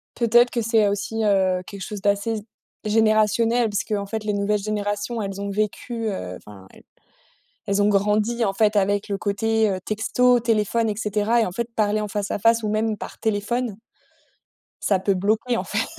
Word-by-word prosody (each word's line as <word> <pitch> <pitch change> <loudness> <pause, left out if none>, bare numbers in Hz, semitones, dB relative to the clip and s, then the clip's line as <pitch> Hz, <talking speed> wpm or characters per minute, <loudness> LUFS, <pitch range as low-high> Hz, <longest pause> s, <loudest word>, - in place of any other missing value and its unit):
Peut-être 240 +1 +4
que 235 - -1
c'est 225 -2 +3
aussi, 210 +2 -2
heu, 190 -3 +2
quelque 200 +1 -9
chose 205 +1 -6
d'assez 205 +3 +1
z - - -6 0.4
générationnel 220 +2 +2
puisqu'en 205 0 -2
fait 220 +1 -4
les 210 - -1
nouvelles 200 +1 +1
générations, 205 +2 -2
elles 195 -1 -5
ont 200 - -3
vécu 220 +3 -2
heu, 90 - -5
enfin 95 -2 -14
elles - - -18 0.9
elles 200 +1 +2
ont 205 - +3
grandi 210 +3 +1
en 195 - 0
fait 210 +1 +2
avec 200 +1 +1
le 200 - -1
côté, 220 +2 +1
heu, 190 -1 -2
texto, 245 +3 +2
téléphone 225 0 +1
et 210 - -2
cetera 215 +2 +1
et - - +2
en 180 - -4
fait 235 +5 -3
parler 215 -1 +1
en 210 - -2
face 205 0 -3
à - - -2
face 230 +2 +3
ou 215 - -1
même 215 0 0
par - - -9
téléphone 220 +1 -1 1.1
ça 195 -2 +2
peut 195 +1 +1
bloquer 215 +6 0
en - - -2
fait. - - -1
210 Hz, 190 wpm, -23 LUFS, 200-225 Hz, 1.1 s, Peut-être